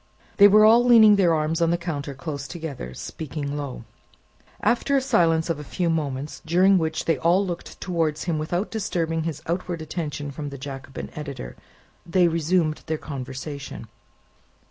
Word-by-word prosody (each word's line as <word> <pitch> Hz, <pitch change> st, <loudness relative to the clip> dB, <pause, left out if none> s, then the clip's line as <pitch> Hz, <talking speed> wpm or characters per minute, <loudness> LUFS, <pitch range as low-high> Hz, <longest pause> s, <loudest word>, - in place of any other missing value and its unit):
They 200 Hz, -1 st, +9 dB
were 215 Hz, +1 st, +6 dB
all 230 Hz, +2 st, +7 dB
leaning 225 Hz, -4 st, +7 dB
their 175 Hz, -5 st, +3 dB
arms 155 Hz, +2 st, -1 dB
on 165 Hz, -, +3 dB
the 170 Hz, -, +2 dB
counter 145 Hz, -5 st, -4 dB
close 140 Hz, +1 st, -5 dB
together, 145 Hz, -, -7 dB
speaking 145 Hz, -2 st, -5 dB
low. 140 Hz, -5 st, -5 dB, 0.8 s
After 245 Hz, +5 st, +2 dB
a -, -, +5 dB
silence 170 Hz, -12 st, +2 dB
of 165 Hz, -3 st, -2 dB
a -, -, -6 dB
few 170 Hz, +4 st, -1 dB
moments, 145 Hz, -3 st, -3 dB
during 185 Hz, +4 st, +4 dB
which 160 Hz, -1 st, -2 dB
they 165 Hz, -, +1 dB
all 180 Hz, +4 st, +3 dB
looked 175 Hz, -2 st, -6 dB
towards 165 Hz, -4 st, -1 dB
him 165 Hz, -3 st, -1 dB
without 175 Hz, +6 st, -2 dB
disturbing 165 Hz, -7 st, -1 dB
his 155 Hz, -2 st, -4 dB
outward 175 Hz, 0 st, -3 dB
attention 150 Hz, -3 st, -4 dB
from 145 Hz, +1 st, -6 dB
the 140 Hz, -, -8 dB
Jacobin 135 Hz, 0 st, -7 dB
editor, 140 Hz, -, -7 dB, 0.5 s
they 175 Hz, 0 st, +3 dB
resumed 165 Hz, -1 st, +1 dB
their 160 Hz, -1 st, -1 dB
conversation. 140 Hz, 0 st, -7 dB
160 Hz, 165 wpm, -24 LUFS, 145-180 Hz, 0.8 s, They